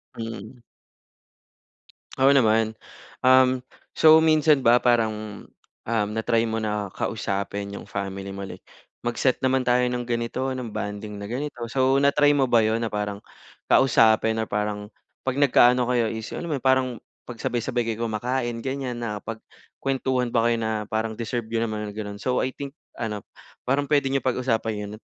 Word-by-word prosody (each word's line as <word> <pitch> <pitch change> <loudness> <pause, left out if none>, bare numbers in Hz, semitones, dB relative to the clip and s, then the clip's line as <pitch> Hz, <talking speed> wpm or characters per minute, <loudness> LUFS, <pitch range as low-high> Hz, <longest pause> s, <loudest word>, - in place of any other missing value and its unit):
Hmm. 115 +1 -7 1.6
Oo 135 - +7
naman. 110 -4 +3 0.5
Um, 130 0 +6 0.4
so, 160 0 +7
minsan 155 -3 +4
ba 120 0 +6
parang, 110 -4 0 0.4
um, 110 -3 +1
na-try 115 +1 +1
mo 110 0 -2
na 105 -3 -3
kausapin 100 -1 -3
'yong - - -9
family 100 -1 -4
mo 100 0 -6
like, - - -10 0.4
"Mag-set 120 +2 0
naman 130 0 +1
tayo 125 0 +3
ng 125 0 -3
ganito, 120 +2 -2
ng 125 -3 -5
bonding 105 0 -5
na 100 - -6
ganito." 125 +2 -4
So, 130 +3 +2
na-try 145 +1 +4
mo 135 - +3
ba 120 -3 +4
'yon 110 +2 +1
na - - -2
parang 105 -1 -2 0.5
kausapin 110 -3 +4
or 110 - 0
parang 105 0 -3 0.3
'pag 130 +1 -1
nagka-ano 125 -2 +5
kayo 120 -2 +2
is 110 +1 -6
yung - - -5
alam 170 - -6
mo - - +1
'yon, - - -34
parang 130 -1 +4 0.4
'pag 120 -2 -9
sabay-sabay 120 0 -1
kayo 115 0 -2
kumakain, 120 +1 -2
ganyan 130 -2 -4
nakapagkuwentuhan 120 +3 -3
ba 115 -1 +1
kayo 120 0 +2
na 110 -1 -2
parang 110 +1 -3
deserve 115 -1 -3
niyo 115 0 0
naman, 105 -1 -4
gano'n? 105 -1 -6
So, 125 +2 0
I 130 - -4
think 140 +1 -8 0.2
ano, 105 -3 -5 0.4
parang 140 +2 0
puwede 145 -2 +3
niyo 135 - +1
pag-usapan 120 -3 0
'yon. 100 - -8
115 Hz, 165 wpm, -24 LUFS, 110-130 Hz, 1.6 s, Oo